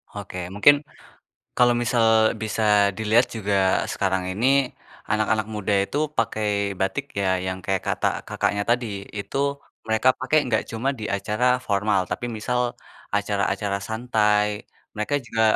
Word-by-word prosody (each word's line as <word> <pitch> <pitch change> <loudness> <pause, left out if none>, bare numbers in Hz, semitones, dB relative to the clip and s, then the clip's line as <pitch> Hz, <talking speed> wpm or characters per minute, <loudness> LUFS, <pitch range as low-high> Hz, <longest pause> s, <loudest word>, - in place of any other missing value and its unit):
Oke, 100 -2 -7 0.2
mungkin 145 +8 +6 0.8
kalau 120 -1 +5
misal 120 0 +2 0.4
bisa 110 +1 -2 0.3
dilihat 110 +3 +3
juga 100 -3 +1
sekarang 95 -1 0
ini 110 +7 0 0.6
anak-anak 110 0 +1
muda 105 -1 -2
itu 140 - -6 0.2
pakai 110 -2 0 0.3
batik 95 +9 -1 0.2
ya, 100 - 0 0.2
yang 95 0 -3
kayak 95 -1 -1
kata, - - -1 0.2
Kakaknya, 100 0 0
tadi, 120 0 +2 0.3
itu 100 - -6 0.5
mereka 110 +3 +2
pakai 130 +4 +1 0.2
gak 110 - +2
cuma 115 +4 -2
di - - -4
acara 105 +4 -2 0.2
formal, 100 0 +1
tapi - - -3
misal 125 +3 -1 0.6
acara-acara 100 0 -1
santai, 105 -2 +2 0.5
mereka 105 +7 -2
juga 110 -1 0
105 Hz, 130 wpm, -23 LUFS, 100-115 Hz, 0.8 s, mungkin